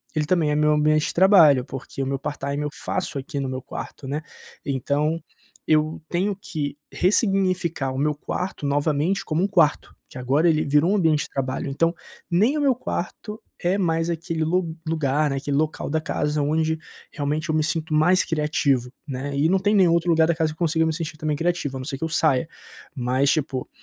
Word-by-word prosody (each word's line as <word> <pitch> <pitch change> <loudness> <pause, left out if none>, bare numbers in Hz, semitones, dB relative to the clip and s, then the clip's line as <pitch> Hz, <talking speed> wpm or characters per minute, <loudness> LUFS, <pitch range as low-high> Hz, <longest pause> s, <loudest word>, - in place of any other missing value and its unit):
ele 155 -1 +1
também 165 -1 +2
é - - +1
meu 150 0 +3
ambiente 155 0 +2
de - - -3
trabalho, 170 -8 +6
porque 135 0 -7
o 135 - -1
meu 135 0 -1
part-time 145 0 -3
eu 150 - -2
faço 140 - -3
aqui 140 +2 -5
no 135 -1 -2
meu 130 0 -4
quarto, 135 +1 -8
né, 145 +3 -2 0.4
então, 145 +4 0 0.5
eu 155 0 +2
tenho 195 +3 0
que 145 -6 -4
ressignificar 185 - +1
o 130 - -5
meu 150 +2 +1
quarto 180 +2 -4
novamente 145 +6 0
como 160 +3 0
um - - +2
quarto, 165 -7 +2
que - - -11
agora 135 +6 +2
ele 155 -1 +2
virou 150 +5 +3
um - - +3
ambiente 160 -6 +2
de - - -13
trabalho. 135 0 -3
Então, 165 +5 +1 0.4
nem 210 - +3
o - - 0
meu 275 -3 +3
quarto 210 -1 -5 0.2
é 175 +2 +2
mais 165 -3 0
aquele 165 -1 -2
lu 165 0 0
lugar, 150 -2 +1
né, 135 - -1
aquele 140 +1 -1
local 155 +1 -1
da 160 +2 +1
casa 150 -1 -1
onde 160 +2 +1 0.3
realmente 150 +2 -2
eu 155 - +1
me 155 - +2
sinto 160 0 -2
mais 180 +5 +4
criativo, 145 -5 0 0.2
né. 140 +1 -4
E 145 +3 +2
não 190 - +4
tem 205 +2 +1
nenhum 185 -4 +5
outro 170 +1 +1
lugar 160 -1 +4
da 170 - +1
casa 160 -1 0
que - - -10
eu - - -37
consiga 160 -1 +2
me 160 - 0
sentir 155 -1 -5
também 155 -1 -1
criativo, 165 -5 -1
a - - -6
não 130 - -6
ser 135 -1 -3
que 135 - -6
eu 160 - -1
saia. 155 -3 +2 0.5
Mas 130 +2 +1
tipo, 140 -5 -2
155 Hz, 210 wpm, -23 LUFS, 140-170 Hz, 0.5 s, trabalho